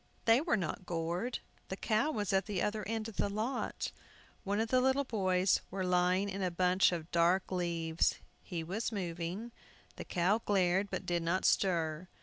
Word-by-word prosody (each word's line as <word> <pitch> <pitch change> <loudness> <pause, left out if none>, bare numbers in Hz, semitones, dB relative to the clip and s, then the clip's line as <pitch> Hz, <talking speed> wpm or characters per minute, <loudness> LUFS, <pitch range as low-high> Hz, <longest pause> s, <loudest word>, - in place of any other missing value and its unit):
They 230 +3 +5
were 310 -7 +1
not 180 0 -4
gored. 175 +8 -2 0.3
The 190 - -3
cow 220 +8 +1
was 210 -9 -1
at 195 +2 +2
the 205 -4 -2
other 210 0 -1
end 225 0 -2
of 225 - -10
the - - +1
lot. 220 +6 -2 0.5
One 200 0 -1
of 225 0 0
the 255 +1 +4
little 265 +2 +3
boys 190 -6 +2
were 190 0 -3
lying 180 +2 +2
in 195 0 -4
a 185 - +1
bunch 180 +2 +3
of 170 -2 -5
dark 175 +3 +2
leaves. 170 -3 0 0.3
He 170 -4 -5
was 195 +9 -3
moving. 180 +3 -4 0.5
The - - -5
cow 190 +6 +1
glared, 190 0 +2
but - - -4
did 175 -1 0
not 170 +3 0
stir. 170 -2 +1
190 Hz, 180 wpm, -33 LUFS, 175-215 Hz, 0.5 s, They